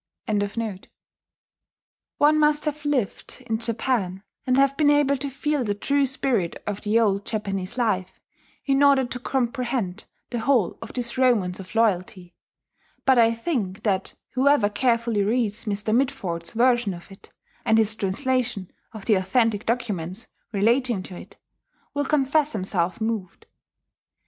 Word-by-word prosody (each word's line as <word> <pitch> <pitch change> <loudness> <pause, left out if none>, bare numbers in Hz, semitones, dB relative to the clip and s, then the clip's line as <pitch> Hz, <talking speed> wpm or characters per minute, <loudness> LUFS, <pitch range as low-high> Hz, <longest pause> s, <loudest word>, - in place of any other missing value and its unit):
] - - -65 1.9
One 305 +1 +4
must 300 0 +3
have 300 0 -3
lived 260 -3 -2
in 225 -2 -1
Japan, 225 -5 -1 0.2
and 255 0 +3
have 275 0 +4
been 295 0 +3
able 290 -1 +4
to 280 +2 -4
feel 285 +1 -1
the 205 -3 -1
true 280 +6 +1
spirit 245 -9 0
of 205 -1 -4
the 215 +2 +2
old 200 -3 +2
Japanese 200 -1 -3
life, 210 -7 -1 0.5
in 275 0 +2
order 280 -2 +5
to 250 +1 -5
comprehend 240 -6 -2 0.3
the 240 - -2
whole 235 -5 +1
of - - -8
this 245 0 -3
romance 210 -9 +2
of 190 +3 -10
loyalty; 185 -4 0 0.7
but 265 -2 +5
I 230 0 +4
think 225 - -3
that 195 -3 -1 0.2
whoever 265 -5 +3
carefully 230 -1 +1
reads 220 +1 0
Mr. 210 +1 0
Mitford's 220 -11 -1
version 240 -4 +2
of 175 +3 -13
it, 195 - -15 0.3
and 220 - +3
his 220 -1 +3
translation 225 0 -1 0.2
of 215 -3 -9
the 220 - +3
authentic 205 +3 +1
documents 215 -4 -2 0.3
relating 230 0 +1
to 185 - -9
it, - - -12 0.6
will 285 0 -1
confess 295 +1 +2
himself 185 -3 0
moved. 220 -5 -3
230 Hz, 145 wpm, -24 LUFS, 200-265 Hz, 1.9 s, order